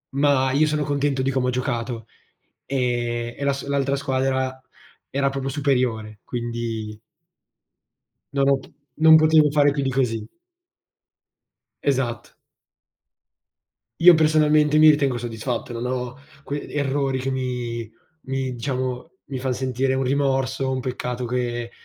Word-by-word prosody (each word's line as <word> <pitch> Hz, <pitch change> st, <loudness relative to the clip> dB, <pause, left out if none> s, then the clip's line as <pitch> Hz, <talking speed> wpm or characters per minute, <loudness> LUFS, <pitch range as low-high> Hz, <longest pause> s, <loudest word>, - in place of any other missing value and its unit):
ma 140 Hz, -2 st, +3 dB
io 150 Hz, +3 st, +3 dB
sono 150 Hz, -1 st, 0 dB
contento 140 Hz, -1 st, 0 dB
di 135 Hz, -, 0 dB
come 130 Hz, -1 st, 0 dB
ho -, -, +2 dB
giocato. 120 Hz, -3 st, -3 dB, 0.6 s
Ehm, 120 Hz, -3 st, -1 dB
e 140 Hz, -, -3 dB
las 140 Hz, -1 st, -1 dB
l'altra 140 Hz, 0 st, 0 dB
squadra 130 Hz, -1 st, -1 dB, 0.5 s
era 140 Hz, 0 st, 0 dB
proprio 135 Hz, 0 st, -3 dB
superiore, 125 Hz, -7 st, -1 dB
quindi 115 Hz, -3 st, -4 dB, 1.4 s
non 140 Hz, 0 st, +3 dB
ho 140 Hz, -, +4 dB
p 135 Hz, -, -13 dB, 0.3 s
non 160 Hz, 0 st, +7 dB
potevo 155 Hz, -1 st, +5 dB
fare 145 Hz, -1 st, +4 dB
più 140 Hz, -1 st, -2 dB
di 135 Hz, -, 0 dB
così. 115 Hz, -4 st, 0 dB, 1.6 s
Esatto. 130 Hz, -4 st, -1 dB, 1.7 s
Io 175 Hz, -1 st, +9 dB
personalmente 155 Hz, -1 st, +4 dB
mi 155 Hz, -, +8 dB
ritengo 140 Hz, -4 st, +2 dB
soddisfatto, 120 Hz, +1 st, -4 dB
non 120 Hz, +1 st, -4 dB
ho 125 Hz, 0 st, -3 dB, 0.3 s
que 145 Hz, +1 st, -5 dB
errori 135 Hz, -2 st, -1 dB
che 130 Hz, +1 st, -2 dB
mi 125 Hz, -3 st, -3 dB, 0.4 s
mi 135 Hz, -1 st, -2 dB
diciamo, 130 Hz, +4 st, -3 dB
mi 135 Hz, -, -5 dB
fan 130 Hz, 0 st, -1 dB
sentire 130 Hz, +1 st, -1 dB
un 135 Hz, -, 0 dB
rimorso, 135 Hz, 0 st, 0 dB
un 130 Hz, -, -1 dB
peccato 125 Hz, -1 st, -4 dB
che 120 Hz, -1 st, -2 dB
130 Hz, 130 wpm, -23 LUFS, 125-140 Hz, 1.7 s, Io